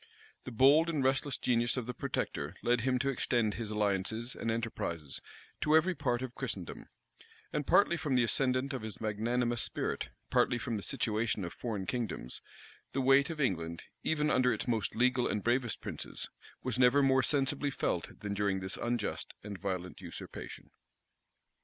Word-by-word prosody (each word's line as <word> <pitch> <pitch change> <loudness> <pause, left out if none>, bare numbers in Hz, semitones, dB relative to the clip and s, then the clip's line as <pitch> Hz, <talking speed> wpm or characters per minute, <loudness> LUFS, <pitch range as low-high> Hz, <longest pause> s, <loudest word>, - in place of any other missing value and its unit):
The 130 - -5
bold 140 +8 +6
and 150 -5 0
restless 135 +1 +2
genius 120 0 +1
of 125 - -1
the 125 - -4
protector - - -3
led 120 0 +3
him 130 +1 +2
to 140 +2 0
extend 120 -4 +1
his 115 -2 -4
alliances 105 +3 0
and 115 - -3
enterprises 95 -10 -3 0.4
to 150 - +4
every 180 +4 +3
part 130 -6 -1
of 125 -2 -5
Christendom; 110 -10 -5 0.7
and 150 -2 -1
partly 170 -4 +5
from 150 -4 0
the 125 - +5
ascendant 130 +3 +1
of 130 - -3
his 110 -2 -6
magnanimous 120 +2 0
spirit, - - -1 0.2
partly 120 - +3
from 120 0 -3
the 105 - -3
situation 110 -5 0
of 85 - -6
foreign 105 -6 -3
kingdoms, 110 - -3 0.5
the 135 - 0
weight 135 +3 +5
of 160 -2 -5
England, 85 - -1 0.2
even 150 -1 +1
under 125 0 +4
its - - -2
most 115 -4 0
legal 125 +1 +3
and 105 - -1
bravest 120 -1 +1
princes, - - -4 0.3
was 125 - -1
never 130 +3 +6
more 130 -1 +5
sensibly 140 +2 +1
felt 90 -10 -2
than 105 -2 -3
during 100 -1 +1
this 95 0 -2
unjust 120 -3 -2
and 100 -2 -6
violent 90 -2 -4
usurpation. 85 -2 -8
120 Hz, 170 wpm, -32 LUFS, 105-135 Hz, 0.7 s, bold